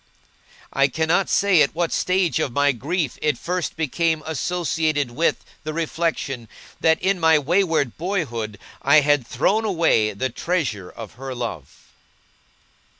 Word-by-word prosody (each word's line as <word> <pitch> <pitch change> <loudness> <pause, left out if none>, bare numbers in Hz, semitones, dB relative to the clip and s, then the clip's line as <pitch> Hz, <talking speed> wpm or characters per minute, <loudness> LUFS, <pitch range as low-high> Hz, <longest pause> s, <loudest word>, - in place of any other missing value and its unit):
I 135 0 +4
cannot 160 +6 +1
say 195 -5 +4
at 145 - +2
what 170 -1 0
stage 180 -7 +1
of 130 - -1
my 145 +3 +3
grief 145 +4 -2
it 150 -4 +1
first 180 +3 -3
became 160 +1 0
associated 160 -3 -1
with 160 +7 0 0.2
the 155 - -4
reflection, 155 -7 -2 0.3
that, 160 0 +3
in 190 0 +1
my 160 -1 +5
wayward 160 - +1
boyhood, 120 - -3 0.2
I 145 +2 +6
had 145 -4 +2
thrown 200 - +1
away 165 - +2
the 130 +7 -2
treasure 130 - -2
of 115 -3 -10
her 135 -1 -5
love. 115 - -7
155 Hz, 140 wpm, -22 LUFS, 130-170 Hz, 0.3 s, I